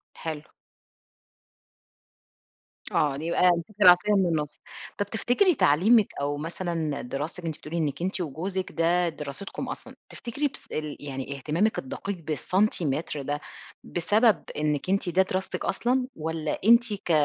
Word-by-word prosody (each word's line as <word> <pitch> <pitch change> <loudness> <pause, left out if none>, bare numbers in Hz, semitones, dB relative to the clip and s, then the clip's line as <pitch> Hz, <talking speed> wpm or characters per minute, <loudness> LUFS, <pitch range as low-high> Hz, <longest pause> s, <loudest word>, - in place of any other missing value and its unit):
حلو. 155 -2 -5 2.5
آه، 145 -2 +2
يبقى 170 +4 +3
مسكتِ 180 +5 -6
العصاية 185 +3 +7
من 195 -2 +4
النص. 155 -4 -1 0.4
طب 205 - 0
تفتكري 250 - +2
تعليمِك 200 +9 +5
أو 145 +1 -1
مثلًا 165 -1 -3
دراستِك 150 +7 -5
أنتِ 160 -2 -3
بتقولي 160 +3 -6
إنك 150 -2 -1
أنتِ 190 +2 -1
وجوزِك 180 +5 -3
ده 170 +1 +2
دراستكم 150 +4 -6
أصلًا، - - -7
تفتكري 280 +5 -2
بس 275 - -11
ال 155 -1 -4
يعني 140 -1 -5
اهتمامِك 165 - 0
الدقيق 200 -8 -5
بالسنتيمتر 160 - 0
ده 145 +2 -3 0.4
بسبب 210 +4 +2
إنِك 150 +1 -1
أنتِ 195 -1 +1
ده 180 +2 +4
دراستِك 190 0 -2
أصلًا؟ 250 +5 +1
والّا 160 -1 -3
أنتِ 235 0 +6
ك 200 - -7
170 Hz, 130 wpm, -27 LUFS, 150-200 Hz, 2.5 s, العصاية